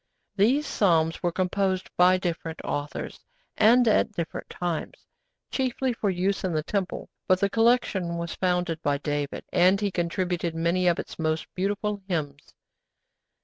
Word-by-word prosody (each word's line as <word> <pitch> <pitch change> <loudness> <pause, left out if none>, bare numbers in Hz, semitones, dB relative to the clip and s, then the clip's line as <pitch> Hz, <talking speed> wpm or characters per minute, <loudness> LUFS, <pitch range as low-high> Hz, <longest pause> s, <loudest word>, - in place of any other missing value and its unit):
These 245 +9 +3
Psalms 165 - +2
were 175 - +1
composed 185 +1 -1
by 180 +1 +5
different 165 -3 -4
authors, 145 0 -4 0.4
and 240 +3 +5
at 215 0 +3
different 170 -4 -5
times, 175 -3 -4 0.5
chiefly 260 -1 0
for 215 -3 -1
use 190 +2 0
in 185 -2 -1
the 155 -1 0
Temple, 195 +2 -3 0.2
but 185 0 +4
the 200 0 +1
collection 225 -7 +2
was 170 0 -4
founded 180 -3 -1
by 145 -2 +1
David, 145 -1 -3
and 185 +2 +4
he 205 -1 -1
contributed 175 -1 -1
many 170 +2 +1
of 175 - +3
its - - -7
most 155 0 0
beautiful 205 +2 -2
hymns. 145 -6 -4
180 Hz, 145 wpm, -26 LUFS, 165-200 Hz, 0.5 s, by